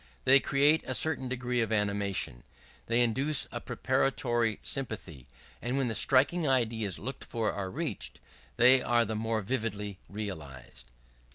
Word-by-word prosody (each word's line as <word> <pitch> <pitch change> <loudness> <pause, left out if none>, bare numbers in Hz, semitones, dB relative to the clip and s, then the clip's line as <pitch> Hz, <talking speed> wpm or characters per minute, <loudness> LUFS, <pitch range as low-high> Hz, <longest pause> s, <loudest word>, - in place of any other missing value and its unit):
They 135 +1 +7
create 145 +4 +3
a 130 - -1
certain 135 -4 0
degree 125 -1 -1
of 110 -1 -1
animation; 100 - -1 0.5
they 115 +1 +2
induce 130 +5 +2
a 120 - -5
preparatory 120 -2 0
sympathy, 105 - -5 0.3
and 125 +3 -2
when 135 -3 0
the - - -2
striking 145 +8 +3
ideas 115 -7 +1
looked 130 +4 -6
for 115 -3 -2
are 95 -2 -4
reached, - - -4 0.4
they 125 +2 +7
are 120 -1 +2
the 110 0 -3
more 110 0 -1
vividly 105 -4 -3
realized. 75 - -8
115 Hz, 145 wpm, -30 LUFS, 105-130 Hz, 0.5 s, They